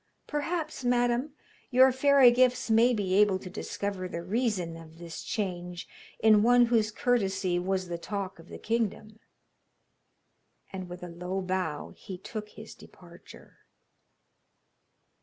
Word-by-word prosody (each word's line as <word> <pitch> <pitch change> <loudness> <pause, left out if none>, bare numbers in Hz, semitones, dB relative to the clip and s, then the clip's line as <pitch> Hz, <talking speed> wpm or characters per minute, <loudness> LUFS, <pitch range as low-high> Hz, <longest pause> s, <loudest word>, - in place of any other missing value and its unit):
Perhaps, 310 -1 -3
madam, 245 +3 +1 0.4
your 260 +1 +6
fairy 265 -1 +6
gifts 250 -1 +2
may 230 +3 +5
be 200 -5 -1
able 200 -1 +4
to 185 -1 -10
discover 195 -1 -4
the 170 -1 -6
reason 195 -4 -1
of 165 -1 -13
this 170 -1 -8
change 180 -4 -4 0.3
in 215 -1 +5
one 245 +2 +5
whose 230 -2 +2
courtesy 195 -6 0
was 185 0 -2
the 170 -1 -5
talk 195 -1 -5
of 165 - -15
the - - -8
kingdom.' 220 -1 -3 1.5
And 185 -2 -6
with 180 0 -9
a - - -5
low 180 +2 -4
bow 185 -5 -3
he 190 - -9
took 210 +3 -7
his 220 +1 -11
departure. 175 -1 -16
200 Hz, 135 wpm, -28 LUFS, 180-240 Hz, 1.5 s, your